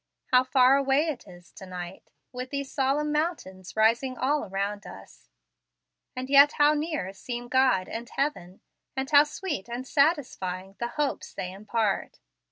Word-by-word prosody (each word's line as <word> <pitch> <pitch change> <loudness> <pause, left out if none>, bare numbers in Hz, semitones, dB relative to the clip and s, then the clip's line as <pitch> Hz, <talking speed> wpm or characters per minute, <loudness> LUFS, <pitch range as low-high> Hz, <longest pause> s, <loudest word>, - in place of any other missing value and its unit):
How 250 0 +6
far 260 +1 +5
away 275 +3 +2
it 295 - -5
is 175 -1 -15
to 190 - -12
night, 180 0 -8 0.2
with 255 0 -6
these 280 -1 -4
solemn 285 +2 0
mountains 295 - -3
rising 235 +4 +2
all 290 +3 +1
around 200 +1 -3
us; 95 -9 -13 0.9
and 255 0 -4
yet 280 +2 +7
how 295 0 +4
near 300 - -3
seem 240 +4 -6
God 255 -8 +3
and 235 +1 -6
heaven, 195 -11 -3 0.3
and 265 0 -2
how 290 0 +7
sweet 295 - -5
and 245 +2 -5
satisfying 200 - 0
the 235 - -1
hopes 295 -2 -2
they 180 - -4
impart! 210 +1 -2
255 Hz, 155 wpm, -27 LUFS, 195-285 Hz, 0.9 s, yet